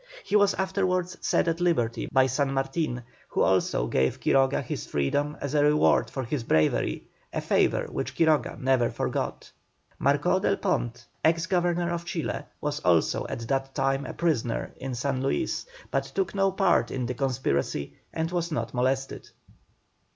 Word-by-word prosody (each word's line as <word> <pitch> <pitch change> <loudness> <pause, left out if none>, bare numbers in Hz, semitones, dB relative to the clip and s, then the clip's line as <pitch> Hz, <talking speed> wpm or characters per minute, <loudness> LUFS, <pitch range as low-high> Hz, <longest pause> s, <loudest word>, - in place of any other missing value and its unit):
He - - -1
was 205 -1 +5
afterwards 185 -1 0
set - - +1
at 165 +1 0
liberty 120 -10 +1
by 130 -1 +5
San 135 +2 0
Martin, 135 -2 -1 0.2
who - - +1
also 95 -9 +2
gave 65 +2 +1
Quiroga 135 -1 +2
his - - -5
freedom 145 - 0
as 140 0 -4
a 145 -1 +4
reward 150 +1 +4
for 135 - -4
his 130 +1 -3
bravery, 80 -8 +1 0.3
a - - -2
favour - - +2
which - - -4
Quiroga 160 -2 +2
never 130 -3 +2
forgot. - - -3 0.5
Marcó - - +2
del - - +2
Pont, - - -1 0.2
ex 165 +1 +3
Governor 175 0 +1
of 170 0 -3
Chile, 170 -2 -3
was 150 0 -2
also 85 - +2
at 115 -1 -5
that 135 +1 -1
time 135 0 0
a - - -5
prisoner 145 -9 0
in 130 -1 -4
San 130 +1 -1
Luis, 230 - -1 0.2
but - - 0
took 390 - 0
no 195 -1 +2
part 190 -1 +2
in 130 -2 -2
the 125 - -2
conspiracy 120 - -1 0.2
and 160 +1 -2
was 170 -1 -1
not 155 - -2
molested. 130 +2 -1
140 Hz, 165 wpm, -27 LUFS, 125-170 Hz, 0.5 s, was